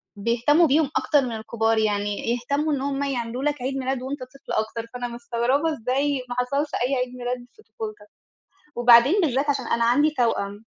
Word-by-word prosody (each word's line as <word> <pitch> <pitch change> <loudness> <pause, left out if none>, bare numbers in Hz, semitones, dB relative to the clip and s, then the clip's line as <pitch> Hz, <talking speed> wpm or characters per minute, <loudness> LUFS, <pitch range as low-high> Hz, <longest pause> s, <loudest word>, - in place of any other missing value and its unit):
بيهتموا 245 +10 +3
بيهم 290 0 +3
أكتر 290 -2 +3
من 250 -2 -3
الكبار، 225 0 0
يعني 205 -1 0 0.2
يهتموا 285 +5 -1
إن 270 - -1
هم 280 0 -2
يعملوا 250 -1 -3
لك 295 -3 -1
عيد 270 +2 -2
ميلاد 260 -1 -2
وأنت 275 +2 -5
طفل 275 +2 -12
أكتر، 225 +1 -2
فأنا 245 0 -4
مستغربة 240 +6 -1
إزاي 275 +1 -1
ما 245 - -4
حصلش 280 +4 -1 0.2
أي 275 - 0
عيد 250 -1 -2
ميلاد 245 0 -4
في 430 - -19
طفولتك، 430 -2 -8 0.7
وبعدين 240 - +6
بالذات 285 -3 +1
عشان 275 -4 -2
أنا 235 0 +1
عندي 285 +6 +4
توأم. 205 -3 -1
255 Hz, 180 wpm, -24 LUFS, 235-285 Hz, 0.7 s, وبعدين